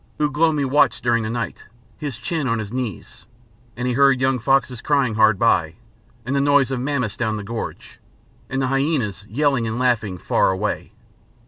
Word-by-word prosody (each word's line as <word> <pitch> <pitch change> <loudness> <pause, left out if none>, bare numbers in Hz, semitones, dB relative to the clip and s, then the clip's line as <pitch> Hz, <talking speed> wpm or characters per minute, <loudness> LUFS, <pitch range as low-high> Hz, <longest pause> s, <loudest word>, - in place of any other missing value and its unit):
Ugh 150 -2 0
lomi 155 -2 +2
watched 135 -2 +2
during 120 -1 +2
the 110 - -3
night, 115 0 -4 0.3
his 145 -6 -5
chin 155 +1 -2
on 115 -1 +1
his 110 0 -5
knees; 125 -8 -6 0.5
and 125 +1 -2
he 125 - 0
heard 135 0 +4
young 130 0 +1
foxes 130 0 +1
crying 140 -6 +1
hard 110 -1 +4
by, 85 -7 +2 0.5
and 130 +3 -1
the 140 - +2
noise 140 -1 +3
of 130 - -1
mammoths 125 -5 -2
down 110 -4 -1
the 105 - -6
gorge, 115 +2 -7 0.5
and 135 0 -1
the - - +2
hyænas 135 - -1
yelling 135 -1 +1
and 110 +1 -3
laughing 115 -7 0
far - - +1
away. 95 +3 -2
125 Hz, 185 wpm, -21 LUFS, 110-140 Hz, 0.5 s, heard